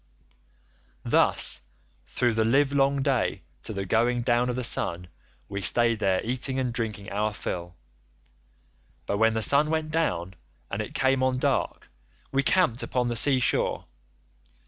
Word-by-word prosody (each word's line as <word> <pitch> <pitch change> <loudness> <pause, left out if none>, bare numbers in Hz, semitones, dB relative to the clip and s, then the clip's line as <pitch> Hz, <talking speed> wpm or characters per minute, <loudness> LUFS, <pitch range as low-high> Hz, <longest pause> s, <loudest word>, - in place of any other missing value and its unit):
"Thus - - +2 0.5
through 120 -2 0
the 110 0 +1
livelong 135 +2 +2
day - - -1 0.2
to - - -6
the 100 -2 -4
going 120 +4 +1
down 120 +1 +1
of 125 - -2
the 125 - -3
sun 90 -6 -1 0.4
we 100 0 -5
stayed 115 +1 +3
there 95 -3 +1
eating 130 +3 -1
and 125 -2 -1
drinking 110 -3 -4
our 105 +2 -1
fill, 85 -3 -5 1.3
but 100 - -2
when 110 0 +3
the 110 - 0
sun 145 +7 +4
went 160 -1 -2
down 95 - -1 0.4
and 100 - -2
it 105 - -8
came 135 0 +1
on 130 0 +1
dark, - - -1 0.4
we 135 - +2
camped 140 -5 +2
upon 125 -1 -1
the 120 - -2
sea 130 +3 +4
shore. 125 - 0
120 Hz, 150 wpm, -26 LUFS, 105-135 Hz, 1.3 s, sun